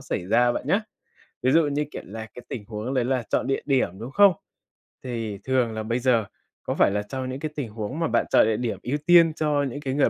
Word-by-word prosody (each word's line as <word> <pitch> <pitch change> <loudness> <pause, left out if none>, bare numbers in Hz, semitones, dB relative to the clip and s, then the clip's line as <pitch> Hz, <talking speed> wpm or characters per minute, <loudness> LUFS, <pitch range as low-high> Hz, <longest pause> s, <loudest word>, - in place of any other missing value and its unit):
xảy 90 - -4
ra 120 +3 +3
bạn - - -4
nhá. - - +3 0.6
Ví 130 - +3
dụ 160 -1 +4
như, 145 +1 -1
kiểu - - -6
là, 110 +3 -7
cái 125 - -10
tình 110 - -5
huống 110 +4 -4
đấy 125 -2 +1
là 130 -2 0
chọn - - 0
địa 135 - 0
điểm, 125 -9 0
đúng 120 +4 -7
không? 200 +2 +6 0.7
Thì 115 -5 -4
thường 130 -3 +1
là 110 0 -4
bây 115 +3 -1
giờ 120 -4 +2 0.4
có - - -2
phải - - +4
là 105 +1 0
trong 130 +3 -5
những 130 - -5
cái 155 +1 -4
tình 135 -7 -4
huống 110 +8 -5
mà 165 - +1
bạn 120 0 +1
chọn - - +5
địa 110 -1 +1
điểm 120 -2 -3
ưu 140 +4 -1
tiên 170 -2 +6
cho 150 -2 0
những 145 - -6
cái 135 -2 -3
người 145 - +3
125 Hz, 255 wpm, -25 LUFS, 110-145 Hz, 0.7 s, không